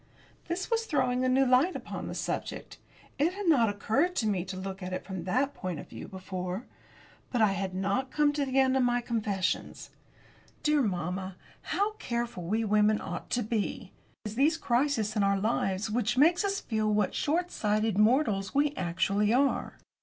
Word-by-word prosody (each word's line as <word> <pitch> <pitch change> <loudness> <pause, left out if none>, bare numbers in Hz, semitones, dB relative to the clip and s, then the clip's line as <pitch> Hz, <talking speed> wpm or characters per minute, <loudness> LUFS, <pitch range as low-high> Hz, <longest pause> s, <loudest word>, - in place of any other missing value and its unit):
This 360 +6 -3
was 455 0 +1
throwing 255 - +1
a 255 - +2
new 265 +1 +4
light 260 +8 +3
upon - - -6
the - - -5
subject. - - -4 0.4
It 325 +5 +2
had 405 +1 -5
not 250 -9 +5
occurred 260 - 0
to 220 - +1
me 190 -4 0
to 190 0 -6
look 190 +1 -6
at 180 0 -5
it 185 - -4
from 185 -3 -6
that 260 +9 +1
point 185 - -5
of - - -10
view - - -8
before. 185 +2 -5 0.7
But 245 - 0
I 210 - +4
had 190 -1 -3
not 200 +8 -1
come 295 0 +2
to 290 -1 0
the 265 -1 -2
end 265 0 +3
of 265 - +3
my 245 -1 +2
confessions. 210 -5 -2 0.7
Dear 300 -1 +3
mamma, 185 -2 -2 0.3
how 410 +2 0
careful 235 - -3
we 215 +6 -1
women 210 0 +3
ought - - -6
to 245 - 0
be! 215 -1 -3 0.3
It - - -2
is 210 - -8
these 305 +5 +3
crises 240 -6 0
in 210 - +2
our 200 0 +2
lives 200 -1 0
which 240 +1 0
make 335 +7 +5
us 395 -1 0
feel 215 -2 -1
what 210 -2 +1
short 350 +4 0
sighted 215 -1 0
mortals 215 -3 +2
we 290 +1 +3
actually 195 +4 +1
are. 270 +3 +1
225 Hz, 190 wpm, -29 LUFS, 195-275 Hz, 0.7 s, not